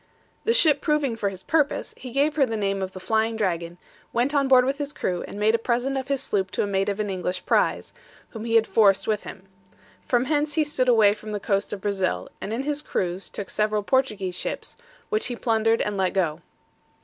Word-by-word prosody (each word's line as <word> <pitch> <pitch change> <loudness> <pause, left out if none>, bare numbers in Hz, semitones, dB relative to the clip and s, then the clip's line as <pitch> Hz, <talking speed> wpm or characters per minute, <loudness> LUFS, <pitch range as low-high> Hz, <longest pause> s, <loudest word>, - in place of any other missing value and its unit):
The 460 - +3
ship 305 - +5
proving 300 -6 +1
for 210 -3 -1
his 190 -1 -10
purpose, 300 -3 0
he 255 - -9
gave 285 +4 +1
her 295 - +4
the 225 -1 -2
name 195 -1 -1
of 190 0 -4
the 185 - -7
Flying 220 +3 0
Dragon, 175 -5 -2 0.3
went 250 +5 0
on 280 -2 +2
board 255 -1 +6
with 275 +2 -1
his 290 0 -4
crew, 180 -1 -2
and 205 - -8
made 215 +1 +3
a 230 - +2
present 245 +4 0
of 265 -1 -3
his 275 -1 -1
sloop 190 -2 0
to - - +1
a - - 0
mate 195 0 0
of 200 +1 -3
an 205 -2 -1
English 180 -1 -3
prize, - - +1 0.4
whom 225 -1 -7
he 230 0 0
had 225 -1 +5
forced 200 -4 +4
with 215 -2 -1
him. 190 - -9 0.6
From 245 0 +1
hence 295 0 0
he 315 - +3
stood 265 -4 0
away 215 -4 +6
for 215 0 -10
the 205 - -2
coast 195 0 -1
of 205 - -5
Brazil, 195 -2 -1
and 205 - -4
in 235 +4 -2
his 295 +1 -2
cruize 185 -7 -3
took 200 - -7
several 210 0 0
Portuguese 210 -7 0
ships, 180 - -4 0.3
which 430 0 0
he 245 - -4
plundered 225 -1 +1
and 210 -1 -2
let 190 -1 +1
go. 170 -6 0
220 Hz, 230 wpm, -24 LUFS, 195-265 Hz, 0.6 s, board